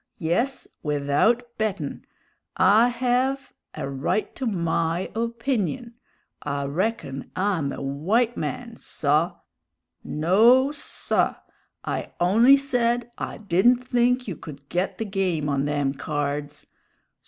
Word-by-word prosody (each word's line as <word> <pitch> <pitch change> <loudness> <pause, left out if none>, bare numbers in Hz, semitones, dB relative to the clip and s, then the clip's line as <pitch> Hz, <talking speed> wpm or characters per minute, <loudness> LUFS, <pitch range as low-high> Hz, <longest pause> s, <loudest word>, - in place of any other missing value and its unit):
Yes, 225 +10 -1
without 150 +11 +2 0.2
bettin'! 195 -9 -2 0.5
I 220 +4 +6
hev 255 +3 0 0.2
a - - -4
right 135 +10 -2
to 260 - -3
my 170 -2 -1
_o_pinion; 235 - -2 0.5
I 140 -1 -2
reckon 140 -3 -2
I'm 185 -7 0
a - - -6
white 195 - +1
man, 245 -2 -4
saw! 155 +5 0 0.7
No, 225 - +4
saw! 295 - -1 0.5
I - - -3
on'y 230 +10 +6
said 245 -3 0
I - - -4
didn't 220 +5 +3
think 250 0 +2
you 190 - -3
could 140 -2 -11
get 180 +2 -1
the 225 - -3
game 185 -7 -1
on 140 -1 0
them 145 -2 0
cards. 145 +1 -3
195 Hz, 115 wpm, -24 LUFS, 150-240 Hz, 0.7 s, I